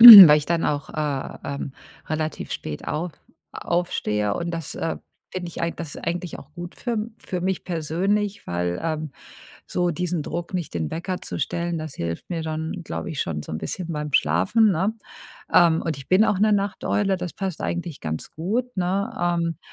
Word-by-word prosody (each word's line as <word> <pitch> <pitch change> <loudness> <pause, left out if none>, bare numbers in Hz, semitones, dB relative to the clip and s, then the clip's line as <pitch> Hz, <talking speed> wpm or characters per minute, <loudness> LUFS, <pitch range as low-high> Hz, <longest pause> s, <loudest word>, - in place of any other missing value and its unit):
weil 200 -10 +14
ich 150 - -5
dann 170 -1 +1
auch, 145 -1 -1
äh, 150 -3 -2
ähm, 140 -1 -4 0.3
relativ 155 0 -2
spät 75 - -5
auf 170 +2 -2 0.4
aufstehe 105 -12 0
und 170 +7 -2
das, 165 -3 -4
äh, 165 - -2 0.3
finde 180 -1 -4
ich - - -7
eig 170 0 -1
das 165 -3 -6
eigentlich 175 0 -3
auch 145 - -13
gut 175 0 -7
für 240 - -3
m 220 0 -2
für 180 - -4
mich 185 +1 -1
persönlich, 190 +5 -1
weil, 85 0 -1
ähm, 155 -2 -2 0.6
so 175 -1 0
diesen 180 0 -1
Druck 170 +4 -4
nicht 175 -5 -3
den 80 -3 -1
Wecker 180 +2 -3
zu - - -4
stellen, 170 +3 -1
das 155 -2 -5
hilft 85 0 -4
mir 170 -2 -2
dann, 160 +2 -3
glaube - - -4
ich 155 -4 -2
schon 75 -3 -2
so - - -8
'n 80 - -2
bisschen 175 - -4
beim 150 -1 -3
Schlafen, 95 - +4
ne, 190 +5 +1 0.6
ähm, 165 -2 +6
und 160 -4 -2
ich 135 - -10
bin 185 +3 +5
auch 200 - +1
'ne 215 +1 +5
Nachteule, 200 0 +1
das 180 -1 -5
passt 190 -4 -3
eigentlich 175 -3 -3
ganz 80 0 -4
gut, 235 +10 -2
ne, 185 +2 0
ähm, 170 -2 +1
170 Hz, 190 wpm, -24 LUFS, 150-185 Hz, 0.6 s, weil